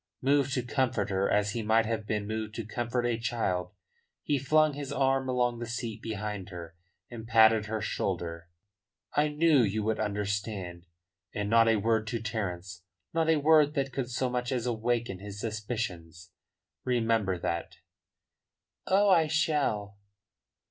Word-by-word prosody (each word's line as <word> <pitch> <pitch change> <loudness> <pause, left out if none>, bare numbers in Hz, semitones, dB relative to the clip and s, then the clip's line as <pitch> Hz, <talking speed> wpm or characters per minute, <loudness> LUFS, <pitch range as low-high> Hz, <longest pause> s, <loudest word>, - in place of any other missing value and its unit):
Moved 140 0 +2
to 125 - 0
comfort 120 -5 0
her 95 +1 +1
as 105 0 +2
he 115 - -3
might 110 +1 +3
have 110 -1 -3
been 105 -1 -1
moved 110 0 -4
to 115 - -4
comfort 120 +2 -2
a 120 -1 0
child, 105 -6 -1 0.5
he 145 -2 +1
flung 155 +3 +3
his 140 -1 -6
arm 135 -1 +1
along 120 -2 +1
the 120 - -5
seat 115 -2 -4
behind 105 -3 -4
her, 85 -3 -9 0.4
and 115 -2 -8
patted 110 -1 +5
her 110 0 -3
shoulder 85 -5 -3 0.6
soothingly. 150 +1 +2
"I 150 - -11
knew 160 -4 +5
you 105 -1 0
would 110 +1 0
understand. 100 -4 -3 0.5
And 105 0 -2
not 115 0 +6
a 115 - +4
word 110 +1 +1
to 115 +2 -2
Terence, 95 -5 -4 0.3
not 165 -1 +1
a 160 - +4
word 150 0 +4
that 135 -2 -1
could 125 -2 -3
so 125 +1 -1
much 125 0 -2
as 125 -3 -1
awaken 120 -4 -1
his 100 0 -8
suspicions. 105 -7 -5 0.5
Remember 115 -6 +1
that." 85 -1 -3 1.1
"Oh, 200 +2 +4
I 170 -5 +5
shall." 140 -11 0
115 Hz, 160 wpm, -29 LUFS, 105-125 Hz, 1.1 s, not